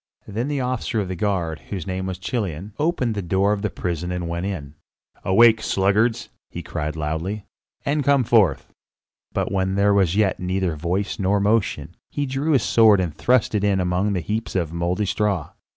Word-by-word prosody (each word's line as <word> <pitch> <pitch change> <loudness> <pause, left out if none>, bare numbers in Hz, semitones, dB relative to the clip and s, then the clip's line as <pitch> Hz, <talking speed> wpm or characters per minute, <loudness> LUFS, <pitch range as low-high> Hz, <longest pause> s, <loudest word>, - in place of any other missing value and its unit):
Then 115 +5 -3
the 145 -2 -1
officer 125 -2 -1
of 95 -3 -2
the 95 - -3
guard, 85 -5 -1
whose 95 -6 -4
name 95 0 -3
was 95 -1 -4
Chilion, 95 -2 -4
opened 145 -7 0
the 105 - -3
door 95 +3 +1
of 100 - -3
the 105 - -1
prison 90 -1 -3
and 90 -1 -3
went 85 +3 -3
in. 75 -8 -5 0.5
"Awake, 110 +3 +5
sluggards!" 105 +4 +1 0.2
he 85 - -7
cried 75 -2 -4
loudly, 80 +7 -3 0.4
"and 145 +1 +1
come 140 -2 +4
forth." 105 - +2 0.6
But - - -2
when 95 -1 0
there 100 +1 +3
was 95 -3 +2
yet 105 -3 +2
neither 90 -2 -1
voice 90 +6 -2
nor 100 +1 +2
motion, 100 -6 0
he 145 - -2
drew 140 +4 0
his 130 -6 +3
sword 110 -3 +5
and 85 -4 -1
thrust 125 +4 +2
it 105 -2 0
in 100 -2 +2
among 90 +3 0
the 90 - -1
heaps 110 +6 -3
of 85 -4 -1
mouldy 85 +4 -1
straw. 100 -4 -1
95 Hz, 190 wpm, -22 LUFS, 90-110 Hz, 0.6 s, Awake